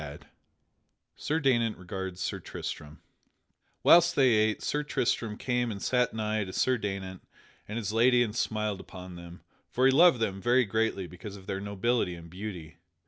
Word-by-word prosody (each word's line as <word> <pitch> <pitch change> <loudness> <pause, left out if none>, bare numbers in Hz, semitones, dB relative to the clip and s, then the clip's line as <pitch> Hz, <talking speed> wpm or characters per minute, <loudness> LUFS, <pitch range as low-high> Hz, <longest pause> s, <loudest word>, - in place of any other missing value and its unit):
[Sidenote: 75 -1 -9 0.9
Sir 155 +2 -1
Daynant 120 -6 +1
regards 95 0 -6
Sir - - -2
Tristam] 75 0 -7 0.8
Whilst 170 0 +6
they 135 -2 +5
ate, 110 -1 +2
Sir 150 - 0
Tristram 115 -6 -1
came 125 -1 -1
and 100 - -6
sat 125 +3 +1
nigh 110 -1 -1
to 95 - -7
Sir 130 +5 +1
Daynant 95 -3 -5 0.5
and 105 - -5
his 105 -2 -3
lady 120 +2 +4
and 110 -2 -4
smiled 105 -4 -1
upon 90 -1 -10
them, 85 0 -11 0.3
for 130 - +1
he 135 - +6
loved 160 -1 +6
them 100 -4 -2
very 125 +2 +3
greatly 110 -2 -1
because 90 +4 -9
of 95 -2 -12
their 95 0 -4
nobility 100 -1 -1
and 85 -1 -12
beauty. 90 -5 -7
105 Hz, 170 wpm, -29 LUFS, 95-120 Hz, 0.9 s, Whilst